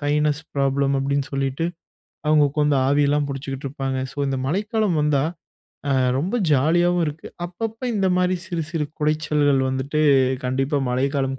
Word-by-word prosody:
Sinus 150 +1 +1
problem 140 0 +1
அப்டீன்னு 140 0 -1
சொல்லிட்டு 135 +3 -1 0.6
அவங்க 155 -1 +5
உட்காந்து 150 0 +1
ஆவியெல்லாம் 145 +1 +2
பிடிச்சுட்டு 135 0 -5
இருப்பாங்க. 135 -1 -3
ஸோ - - -19
இந்த 135 -1 -1
மழைக்காலம் 210 +3 0
வந்தா 145 -2 +2 0.7
அ - - +2 0.3
ரொம்ப 185 - -1
ஜாலியாவும் 170 +5 +3
இருக்கு. 150 +2 -6 0.2
அப்பப்போ 225 +7 -5
இந்த 195 -2 +1
மாதிரி 180 0 +2
சிறு, 175 -3 -3
சிறு 160 -2 -1
குடைச்சல்கள் 150 -2 +2
வந்துட்டு 130 +3 -1 0.4
கண்டிப்பா, 135 +3 0
மழைக்காலம் 135 +1 0
145 Hz, 135 wpm, -22 LUFS, 135-165 Hz, 0.7 s, அவங்க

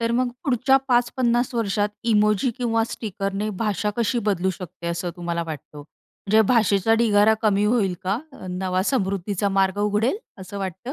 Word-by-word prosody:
तर 230 0 0
मग 250 +1 +1 0.2
पुढच्या 265 0 +3
5-50 245 0 +1
वर्षात 210 -2 0 0.2
इमोजी 210 +3 +3
किंवा 230 -2 +1
स्टिकरने 200 -1 -3 0.2
भाषा 210 0 0
कशी 235 +1 +1
बदलू 190 0 0
शकते, 175 -1 -8
असं 175 +1 -2
तुम्हाला 170 -1 -2
वाटतं? 150 -1 -8 0.5
म्हणजे 220 +2 +5
भाषेचा 220 -1 +3
ढिगारा 215 -1 +4
कमी 205 -1 +2
होईल 210 -4 +2
का? 195 +5 0
अ, 190 - -11
नवा 185 0 -1
समृद्धीचा 200 -4 -1
मार्ग 190 +1 +2
उघडेल? 215 - +1 0.2
असं 200 +2 -7
वाटतं. 190 -2 -4
205 Hz, 155 wpm, -23 LUFS, 190-230 Hz, 0.5 s, म्हणजे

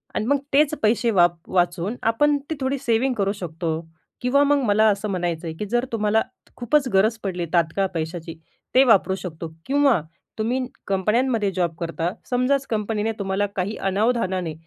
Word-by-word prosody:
आणि 215 - -1
मग 285 +4 +3 0.2
तेच 295 +1 +4
पैसे 230 +2 +3
वा 175 -4 +6 0.2
वाचून 180 +3 0 0.2
आपण 295 +5 +2
ती 320 - -2
थोडी 270 +1 -1
सेव्हिंग 250 0 +1
करू 200 -4 0
शकतो. 165 -4 -3 0.4
किंवा 275 +3 +3
मग 285 0 +3
मला 215 0 +3
असं 205 +1 -1
म्हणायचं 175 -3 -2
आहे, 160 - -5
की 210 - -3
जर 240 +1 +1
तुम्हाला 220 -1 +2 0.4
खूपच 265 +3 +1
गरज 215 +4 +3
पडली 180 -3 -2
तात्काळ 170 +3 +2
पैशाची 165 0 -4 0.4
ते 260 - +8
वापरू 200 -6 +4
शकतो. 170 -3 -6 0.2
किंवा 275 - +3 0.4
तुम्ही 250 +4 0 0.2
कंपन्यांमध्ये 215 +2 +1
जॉब 175 -3 -1
करता. 170 0 -2 0.2
समजाच 260 +2 +1
कंपनीने 215 0 -1
तुम्हाला 195 +1 0
काही 195 +3 -2
अनावधानाने 190 -5 0
210 Hz, 160 wpm, -23 LUFS, 180-245 Hz, 0.4 s, ते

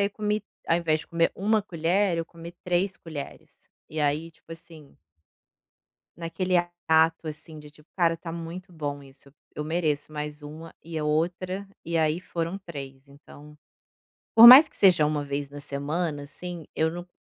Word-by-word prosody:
aí - - +1
comi 210 +1 -2 0.2
ao 165 - +3
invés 160 -2 0
de - - -12
comer 165 -1 +1
1 215 +3 +1
colher, 180 0 0
eu 165 - -2
comi 170 0 -11
3 180 +2 0
colheres. 155 -4 -10 0.2
E 155 - -3
aí, 150 +3 0
tipo 165 - -26
assim 165 -3 -13 1.2
naquele 180 +2 -1
a 175 0 +1 0.2
ato, 160 0 +3
assim, 155 +1 -9
de, 150 0 -12
tipo: 150 +1 -22
"Cara, 170 -2 +2
tá 165 0 -8
muito 170 +3 -8
bom 145 -3 -5
isso, 135 0 -17 0.2
eu 150 - -4
mereço 155 -2 -1
mais 150 0 -6
uma 155 +3 -10
e 165 0 -6
a 150 - -2
outra", 175 +5 -1 0.2
e 170 0 -2
aí 160 +1 +1
foram 170 +1 -4
3 140 -6 -10
então, 145 +1 -15 0.8
por 230 +1 +12
mais 275 +5 +11
que - - -21
seja 175 -6 +5
uma 150 -1 -1
1 145 - -10 0.2
na 145 0 -9
semana, 145 +2 -3
assim, 170 +3 -8
eu 160 0 +1
não 175 +1 -7
165 Hz, 175 wpm, -26 LUFS, 150-175 Hz, 1.2 s, por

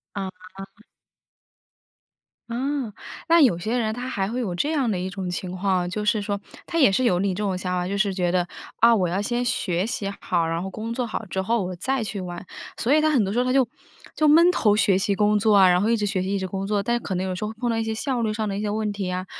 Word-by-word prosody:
啊。 190 -1 -4 2.2
啊。 260 -1 -2 0.4
那 335 +1 +6
有 245 - +5
些 220 +8 -2
人 220 -2 0
他 245 +2 -5
还 195 -5 -1
会 240 +3 -3
有 200 -7 -2
这 290 - 0
样 280 -6 +1
的 185 - -1
一 185 - -3
种 190 -1 -5
情 180 +1 -4
况。 185 -1 0
就 210 +4 -3
是 210 0 +2
说 200 0 -2 0.3
他 335 - -3
也 270 -9 +6
是 225 +7 +1
有 180 -8 +3
你 195 0 0
这 205 +4 -3
种 195 -3 -1
想 180 0 -2
法， 180 0 -1
就 200 - -2
是 200 -1 +1
觉 180 -2 0
得， 180 -1 +1 0.3
啊， 230 +1 +6
我 185 -4 +1
要 185 +4 -1
先 240 +4 -1
学 185 -6 0
习 205 -3 -2
好， 170 -2 0
然 165 +1 -2
后 190 - -4
工 220 +4 -5
作 245 +1 -1
好 225 - -5
之 190 - -1
后 225 +2 0
我 180 0 -5
再 260 +7 -1
去 205 -1 -4
玩。 180 -1 -6 0.3
所 255 - +1
以 310 - +5
他 310 - +3
很 255 -7 +3
多 195 - -2
时 230 - 0
候 250 - +2
他 255 - +1
就 265 -2 +3 0.5
就 310 - +3
闷 330 +4 +7
头 210 - +3
学 205 -3 +3
习 200 +1 0
工 210 +1 +3
作 215 0 +4
啊， 195 -2 +7
然 180 0 +3
后 210 - +1
一 230 - +4
直 210 - -1
学 200 -2 -1
习 190 +2 -2
一 200 - 0
直 190 - -3
工 195 +1 -4
作， 205 -1 +1
但 240 +1 0
可 190 - -3
能 185 +1 -1
有 185 -1 -2
时 185 - -5
候 215 - -2
会 - - -13
碰 240 - -1
到 230 - 0
一 225 - 0
些 220 0 -2
效 250 +2 -2
率 215 -2 0
上 215 0 -2
的 195 -1 -3
一 205 - -3
些 210 - -1
问 215 0 -1
题 200 -2 -3
啊， 185 0 -3
205 Hz, 305 characters per minute, -24 LUFS, 185-235 Hz, 2.2 s, 闷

